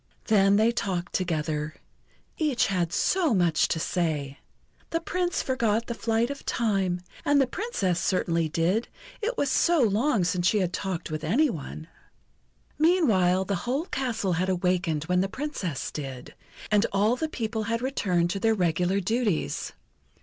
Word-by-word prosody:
Then 200 -2 +4
they 220 +3 +4
talked 190 -7 -3
together. 155 -3 -2 0.6
Each 295 -6 +1
had 175 -4 0
so 335 - +2
much 175 -4 +3
to 160 - -1
say. 155 -5 -2 0.5
The 330 - 0
Prince 355 +1 -1
forgot 230 -4 0
the 235 - -3
flight 230 +2 0
of 280 - -7
time, 195 -6 0 0.2
and 290 0 +3
the 270 - +4
Princess 250 - -1
certainly 170 -3 0
did, 175 +9 +1 0.3
it 465 +3 -2
was 280 - +1
so 345 -1 +3
long 225 -1 +2
since 175 0 +1
she 215 - +3
had 180 -3 0
talked 180 -4 -3
with 155 0 -4
any 255 - +2
one. 155 -1 -7 0.9
Meanwhile 215 - +3
the 200 - -2 0.2
whole 280 +6 0
castle 230 - -1
had 180 +3 0
awakened 180 -4 0
when 180 +2 +1
the 195 - -1
Princess 200 - -4
did; 135 -4 -7 0.4
and 210 +1 +4
all 210 +4 +2
the 315 +4 -3
people 225 -5 -3
had 230 +2 -1
returned 180 -10 0
to 195 - -2
their 225 +2 +2
regular 180 +1 +1
duties. 210 - -1
195 Hz, 155 wpm, -26 LUFS, 175-245 Hz, 0.9 s, Then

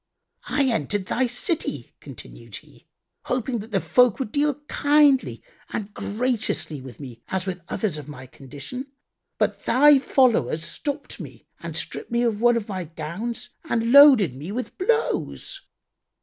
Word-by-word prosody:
"I 285 - +1
entered 205 - 0
this - - -19
thy 255 +1 +1
city" 240 - -3
(continued - - -11
he), - - -13 0.4
"hoping 250 -1 -1
that 215 +2 -9
the 195 - +2
folk 250 +2 +3
would 265 -6 -4
deal 290 +1 +1
kindly 290 -2 +3 0.3
and 210 -1 -5
graciously 215 - -2
with 130 -3 -11
me 125 -5 -10
as 190 -1 -2
with 185 -2 -4
others 185 -9 -2
of 145 - -10
my 130 -3 -9
condition,[FN#86] 145 - -8 0.5
but - - -1
thy 290 +1 +6
followers 230 - +2
stopped 290 -1 -5
me - - -10
and - - -7
stripped 450 - -5
me 235 0 +1
of 225 -3 0
one 240 0 +5
of 220 - -4
my 185 -4 -4
gowns 170 +9 -5
and 230 0 0
loaded 265 - +8
me 145 +8 -7
with 245 +4 -5
blows. 450 +4 -1
225 Hz, 155 wpm, -24 LUFS, 165-260 Hz, 0.5 s, loaded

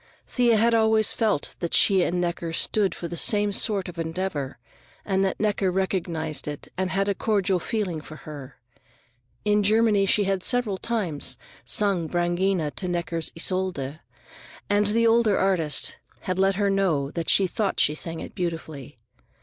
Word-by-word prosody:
Thea 240 -3 +2
had 230 +2 +3
always 220 -1 +4
felt 215 -10 -1
that 170 - -1
she 195 -3 +5
and 175 0 0
Necker 170 -1 -2
stood 195 +2 +1
for 170 - -5
the 170 - -6
same 205 +4 +2
sort 200 -1 0
of 175 -1 -8
endeavor, 160 -5 -3 0.5
and 195 -1 +1
that 190 - -1
Necker 205 -2 +1
recognized 170 -5 -2
it 145 -1 -6
and 185 0 -1
had 195 +1 0
a 200 - +2
cordial 195 -2 0
feeling 185 -5 -2
for 155 - -11
her. 145 -4 -10 0.9
In 210 0 +3
Germany 210 -1 +3
she 205 - +3
had 195 -1 0
several 225 -4 0
times 195 -11 -2 0.3
sung 195 -6 +1
Brangaena 175 -1 0
to 185 - -2
Necker's 170 -2 -2
Isolde, 165 -5 -2 0.7
and 205 0 +2
the 230 +2 +2
older 225 -2 +4
artist 170 -7 +1 0.2
had 185 0 -3
let 195 0 +3
her 200 0 +1
know 165 -8 0
that 165 -1 -3
she 195 - +5
thought 195 +2 -2
she 150 - +3
sang 165 +1 -5
it - - -8
beautifully. 160 -6 -5
190 Hz, 165 wpm, -25 LUFS, 165-205 Hz, 0.9 s, she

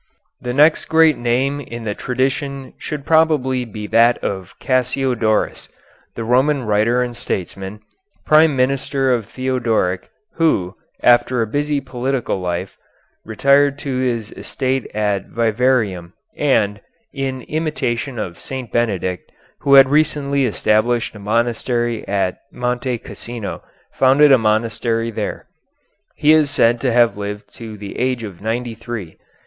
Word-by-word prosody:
The 125 - -3
next 150 +5 +4
great 160 -1 +4
name 130 +4 0
in 120 -3 -8
the 105 -2 -2
tradition 135 +3 -2
should 150 -2 -6
probably 150 -6 +2
be 105 -2 -7
that 115 +3 +4
of 95 -2 -4
Cassiodorus, 130 -4 0 0.5
the 115 - -4
Roman 130 +4 +2
writer 110 +3 +2
and 120 -1 -5
statesman, 95 +1 -5 0.4
prime 155 -1 +5
minister 135 +1 +1
of 115 -4 -2
Theodoric, 120 -8 -1 0.3
who, 100 - +1 0.3
after 120 0 +4
a - - -1
busy 145 +5 -1
political 130 -4 -2
life, 90 +1 -4 0.5
retired 140 +5 +3
to 135 -3 -4
his 115 -4 -2
estate 130 -1 -3
at 105 -2 -1
Vivarium, 110 -6 0 0.2
and, 105 -8 +1 0.3
in 135 -2 -3
imitation 140 -5 -2
of 95 -6 -5
St. 130 -3 -7
Benedict, 95 -6 -1 0.3
who 140 0 +4
had 135 -1 +8
recently 140 -2 +1
established 115 +1 +1
a 105 - -11
monastery 120 +2 -1
at 95 -2 -1
Monte 125 0 -2
Cassino, 115 -1 -7 0.3
founded 140 +3 +5
a 135 - +7
monastery 115 +1 0
there. - - -4 0.7
He 150 - +3
is 155 -2 +4
said 120 -4 +2
to 130 - +1
have 120 -2 +3
lived 105 0 -6
to 110 -2 -8
the 100 -1 -8
age 125 -1 0
of 100 -5 -8
ninety 115 +2 -2
three. 115 -6 -7
120 Hz, 130 wpm, -19 LUFS, 110-135 Hz, 0.7 s, had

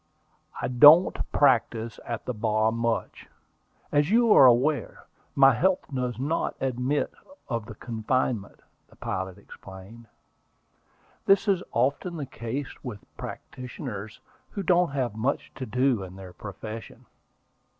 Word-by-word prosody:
"I - - -2
don't 150 +8 +7 0.2
practise 115 -4 +2
at 120 -2 -4
the 125 - -2
bar 110 0 +1
much, 115 0 -3 0.6
as 145 +1 +2
you 230 0 +5
are 135 - +8
aware: 125 +1 +1 0.3
my 135 -1 +7
health 185 +10 +1
does 125 -2 -2
not 145 +6 -1
admit 130 +2 -1 0.3
of 115 -4 -3
the 110 - -9
confinement," 115 -1 -2 0.3
the - - -20
pilot 95 0 -4
explained. 100 +3 -13 1.2
"That 195 +2 +4
is 195 -3 +2
often 140 +8 0
the 145 - -4
case 125 +3 -6
with 105 -7 -8
practitioners 120 -5 -8 0.3
who 200 - -5
don't 175 0 +3
have 130 -5 -2
much 120 +6 -2
to 130 - -7
do 125 0 +1
in 95 -1 -9
their 95 -2 -11
profession." 110 +3 -9
125 Hz, 130 wpm, -26 LUFS, 110-140 Hz, 1.2 s, are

